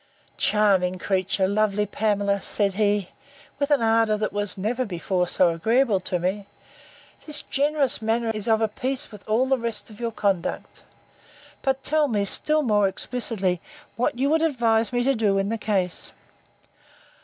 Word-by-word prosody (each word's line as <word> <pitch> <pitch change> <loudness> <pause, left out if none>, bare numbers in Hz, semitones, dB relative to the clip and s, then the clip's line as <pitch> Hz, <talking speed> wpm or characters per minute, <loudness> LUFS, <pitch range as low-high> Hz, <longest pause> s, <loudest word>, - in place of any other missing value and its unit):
Charming 195 -4 +2
creature! 190 +1 0
lovely 210 0 +1
Pamela! 205 -1 0
said 200 -1 0
he, 205 -2 0 0.5
(with 285 0 0
an 285 -5 +2
ardour 225 -1 +3
that 210 -2 -3
was 205 -1 -1
never 230 +6 -1
before 180 -3 -2
so 180 0 +3
agreeable 220 +6 +1
to 180 0 -2
me,) 190 +3 -3 0.8
this 300 -1 -2
generous 285 -3 +1
manner 225 +1 0
is 215 0 -5
of 220 -1 +3
a 220 - +3
piece 255 +5 -3
with 210 -2 -12
all 230 +4 +2
the 265 -1 +1
rest 230 -2 -4
of 210 - -14
your 235 -1 -2
conduct. 195 -5 -2 0.8
But 270 -1 -1
tell 305 0 +2
me, 210 -5 0
still 305 +9 +2
more 210 -5 +3
explicitly, 195 -4 -1 0.3
what 235 +1 -1
you 275 +3 +1
would 320 0 +3
advise 235 -7 +1
me 245 0 0
to, 225 -7 +1
in 195 +1 0
the 225 0 -2
case. 190 -5 +2
215 Hz, 160 wpm, -24 LUFS, 200-245 Hz, 0.8 s, ardour